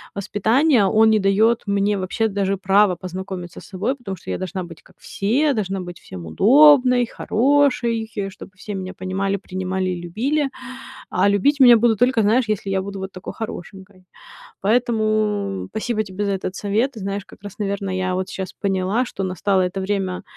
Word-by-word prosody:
воспитания, 220 Hz, +5 st, +2 dB
он 220 Hz, +2 st, +4 dB
не 215 Hz, -1 st, +4 dB
дает 215 Hz, +4 st, +2 dB
мне 200 Hz, 0 st, +1 dB
вообще 195 Hz, +4 st, -1 dB
даже 195 Hz, -1 st, -1 dB
права 195 Hz, 0 st, +3 dB
познакомиться 185 Hz, 0 st, -7 dB
с -, -, -14 dB
собой. 210 Hz, +8 st, -2 dB
Потому 195 Hz, -8 st, -7 dB
что -, -, -12 dB
я -, -, -2 dB
должна 185 Hz, 0 st, -4 dB
быть 165 Hz, -2 st, -11 dB
как 185 Hz, -, -22 dB
все, 270 Hz, +9 st, 0 dB
должна 195 Hz, -3 st, -2 dB
быть 175 Hz, -1 st, -8 dB
всем 90 Hz, -2 st, -10 dB
удобной, 250 Hz, -, +5 dB
хорошей, 235 Hz, -3 st, +1 dB, 0.2 s
чтобы 190 Hz, -, -12 dB
все 205 Hz, +2 st, -7 dB
меня 185 Hz, 0 st, -5 dB
понимали, 195 Hz, +2 st, -2 dB, 0.2 s
принимали 185 Hz, 0 st, -2 dB
и 180 Hz, -1 st, -4 dB
любили, 270 Hz, -, -1 dB, 0.6 s
а 185 Hz, +2 st, +2 dB
любить 275 Hz, +9 st, +2 dB
меня 245 Hz, -2 st, +9 dB
будут 225 Hz, -2 st, +2 dB
только, 245 Hz, -2 st, +3 dB
знаешь, 230 Hz, +4 st, +3 dB
если 205 Hz, -2 st, -2 dB
я 190 Hz, -1 st, 0 dB
буду 195 Hz, 0 st, -6 dB
вот 190 Hz, 0 st, -6 dB
такой 185 Hz, -, -8 dB
хорошенькой. 190 Hz, -2 st, -9 dB, 0.6 s
Поэтому 215 Hz, -3 st, 0 dB
спасибо 220 Hz, +1 st, -2 dB
тебе 205 Hz, +1 st, -4 dB
за 200 Hz, -, 0 dB
этот 190 Hz, -1 st, -3 dB
совет. 215 Hz, +7 st, 0 dB
Ты 225 Hz, -, -10 dB
знаешь, 200 Hz, 0 st, -4 dB
как -, -, -17 dB
раз, 205 Hz, +1 st, -10 dB
наверно, 200 Hz, -1 st, -2 dB
я 185 Hz, 0 st, -1 dB
вот 185 Hz, +1 st, -3 dB
щас 190 Hz, -1 st, -5 dB
поняла, 195 Hz, +5 st, 0 dB
что 195 Hz, -, -5 dB
настало 185 Hz, +1 st, 0 dB
это 180 Hz, +1 st, -2 dB
время, 190 Hz, -2 st, -2 dB
200 Hz, 180 wpm, -21 LUFS, 190-225 Hz, 0.6 s, меня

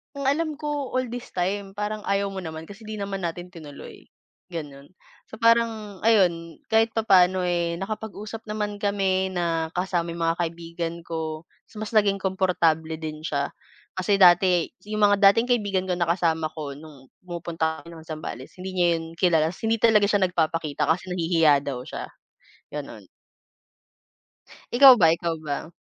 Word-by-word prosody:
"Ang 275 Hz, -1 st, -3 dB
alam 310 Hz, +3 st, +1 dB
ko, 295 Hz, -3 st, -3 dB
all 255 Hz, -1 st, 0 dB
this 245 Hz, +1 st, -7 dB
time, 195 Hz, +2 st, -2 dB
parang 210 Hz, +1 st, -4 dB
ayaw 200 Hz, 0 st, 0 dB
mo 190 Hz, -2 st, -6 dB
naman, 160 Hz, 0 st, -7 dB
kasi, 205 Hz, +3 st, -12 dB
'di 215 Hz, -1 st, -6 dB
naman 195 Hz, -2 st, -4 dB
natin 175 Hz, +1 st, -4 dB
tinuloy." 160 Hz, -5 st, -11 dB, 0.5 s
Gano'n. 145 Hz, -2 st, -8 dB, 0.4 s
So, 220 Hz, -, -10 dB
parang 225 Hz, -4 st, +1 dB
ayun, 175 Hz, -7 st, +2 dB
kahit 225 Hz, 0 st, +3 dB
papaano, 190 Hz, -4 st, +4 dB
eh, 170 Hz, -1 st, -1 dB
nakapag-usap 215 Hz, +2 st, -6 dB
naman 210 Hz, -1 st, -3 dB
kami, 195 Hz, -2 st, 0 dB
na 165 Hz, -2 st, -1 dB
kasama 180 Hz, -2 st, -1 dB
yung 170 Hz, -, -7 dB
mga 165 Hz, -, +2 dB
kaibigan 170 Hz, 0 st, -4 dB
ko. 160 Hz, 0 st, -5 dB, 0.2 s
Tas 215 Hz, -, -13 dB
mas 215 Hz, +1 st, -5 dB
naging 200 Hz, -2 st, +3 dB
komportable 165 Hz, -4 st, 0 dB
din 155 Hz, -1 st, -6 dB
siya, 140 Hz, -3 st, -1 dB, 0.5 s
kasi 195 Hz, +2 st, +1 dB
dati, 180 Hz, -1 st, +5 dB, 0.2 s
yung 215 Hz, -, -2 dB
mga 200 Hz, -1 st, +6 dB
dating 230 Hz, +3 st, 0 dB
kaibigan 205 Hz, -6 st, 0 dB
ko, 180 Hz, -, 0 dB
na 175 Hz, -, 0 dB
kasama 160 Hz, -3 st, 0 dB
ko, 150 Hz, -3 st, -6 dB
no'ng 145 Hz, -3 st, -14 dB, 0.2 s
pumupunta 165 Hz, -2 st, -3 dB
kami 170 Hz, 0 st, -12 dB
ng 160 Hz, -, -11 dB
Zambales, 155 Hz, -5 st, -7 dB
hindi 185 Hz, 0 st, -6 dB
niya 175 Hz, -1 st, +3 dB
'yon 165 Hz, -, -7 dB
kilala. 165 Hz, -3 st, +3 dB
Tas 175 Hz, +6 st, -8 dB
hindi 225 Hz, 0 st, +1 dB
talaga 220 Hz, -2 st, +5 dB
siya 205 Hz, -, +3 dB
nagpapakita 160 Hz, -3 st, -1 dB
kasi 180 Hz, +3 st, -2 dB
nahihiya 165 Hz, -5 st, +3 dB
daw 135 Hz, -4 st, -4 dB
siya, -, -, -7 dB, 0.6 s
gano'n. -, -, -7 dB, 1.6 s
Ikaw 260 Hz, +1 st, +9 dB
ba, 165 Hz, -7 st, +5 dB
ikaw 165 Hz, 0 st, -1 dB
ba? 155 Hz, +1 st, -5 dB
180 Hz, 160 wpm, -25 LUFS, 165-205 Hz, 1.6 s, Ikaw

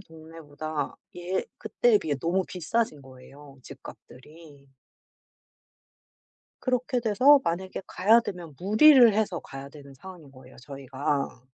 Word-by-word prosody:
동네보다 155 Hz, -3 st, -8 dB, 0.2 s
예 180 Hz, +2 st, -3 dB
그때에 220 Hz, +1 st, +1 dB
비해 155 Hz, -6 st, -3 dB
너무 175 Hz, +6 st, -1 dB
비싸진 180 Hz, -1 st, -3 dB
거예요 135 Hz, +2 st, -16 dB
집값들이. 145 Hz, +3 st, -15 dB, 1.9 s
그렇게 250 Hz, -1 st, -1 dB
돼서 255 Hz, +6 st, +4 dB
만약에 185 Hz, +3 st, -4 dB
가야 215 Hz, +6 st, +3 dB
되면 175 Hz, -8 st, -8 dB
무리를 235 Hz, +5 st, +6 dB
해서 205 Hz, -5 st, -1 dB
가야 135 Hz, 0 st, -10 dB
되는 140 Hz, -1 st, -15 dB
상황인 175 Hz, -1 st, -13 dB
거예요 130 Hz, -1 st, -17 dB
저희가. 135 Hz, 0 st, -5 dB
165 Hz, 270 characters per minute, -26 LUFS, 140-205 Hz, 1.9 s, 무리를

